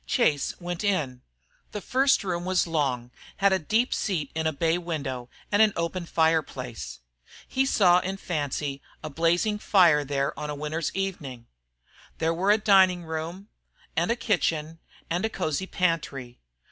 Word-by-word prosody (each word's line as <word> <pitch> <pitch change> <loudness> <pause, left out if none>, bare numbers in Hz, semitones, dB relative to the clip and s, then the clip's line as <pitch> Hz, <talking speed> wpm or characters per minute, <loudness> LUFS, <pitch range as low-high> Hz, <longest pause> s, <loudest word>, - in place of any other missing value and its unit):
Chase 145 - +1
went 175 +1 -4
in. 150 -11 0 0.5
The 210 - -3
first 265 +4 +2
room 175 -3 -2
was 185 0 +1
long, 135 -7 -1 0.3
had 200 -1 +4
a 190 - +2
deep 220 - +1
seat 180 -8 -2
in 160 0 -1
a - - +1
bay 165 +3 +1
window 140 -8 -4 0.2
and 205 +1 +4
an 215 -2 +5
open 170 +1 -2
fire 160 -1 +3
place. 120 - -8 0.5
He 265 +1 +1
saw 180 -8 +5
in 190 +2 -4
fancy 145 -5 -3 0.2
a 155 - -4
fire - - -15
blazing 175 +7 +1 0.5
there 140 -1 -1
on 150 - -4
a 150 - -3
winter's 150 +2 -3
evening. 150 -11 -4 0.7
There 165 0 +1
were 185 +4 0
a 210 - +6
dining 190 -4 +4
room, 165 +5 -5 0.5
and 235 +1 +1
kitchen, 165 -6 0 0.3
and 175 +2 0
a 220 - +1
cosey 185 -2 -2
pantry. 150 -10 -2
165 Hz, 160 wpm, -26 LUFS, 150-190 Hz, 0.7 s, a